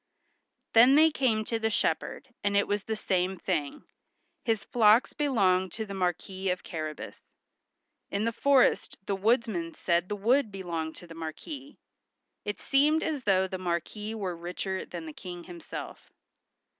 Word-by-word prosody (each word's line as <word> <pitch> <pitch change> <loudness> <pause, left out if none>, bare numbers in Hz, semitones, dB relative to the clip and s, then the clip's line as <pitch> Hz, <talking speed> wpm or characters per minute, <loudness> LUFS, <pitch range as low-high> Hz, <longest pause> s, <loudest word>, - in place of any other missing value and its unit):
Then 245 +4 +8
they 315 +1 +6
came 225 -7 +1
to 230 0 -1
the 220 0 +1
shepherd, 245 +3 -1
and 200 0 +2
it 200 - +3
was 205 0 0
the 220 - -2
same 190 -2 0
thing; 155 -6 -2 0.6
his 225 -3 0
flocks 225 0 +4
belonged 190 - +2
to 220 - -4
the 200 - -7
Marquis 190 +1 -2
of 180 0 -1
Carrabas. 155 -2 -6 0.8
In 200 +2 -1
the 230 - +1
forest 270 +3 +3
the 200 - 0
woodsmen 205 -5 +1
said 175 0 +1
the 210 - -1
wood 230 +3 +2
belonged 170 -5 -4
to 175 - -11
the 165 - -11
Marquis. 270 - -7 0.7
It 205 - -3
seemed 300 +4 +3
as 295 -5 -2
though 190 -2 +3
the 185 0 -5
Marquis 185 +5 -3
were 190 -5 -3
richer 180 +3 -4
than 170 -2 -7
the 155 - -7
King 175 +1 -8
himself. 175 -2 -9
200 Hz, 155 wpm, -29 LUFS, 180-230 Hz, 0.8 s, Then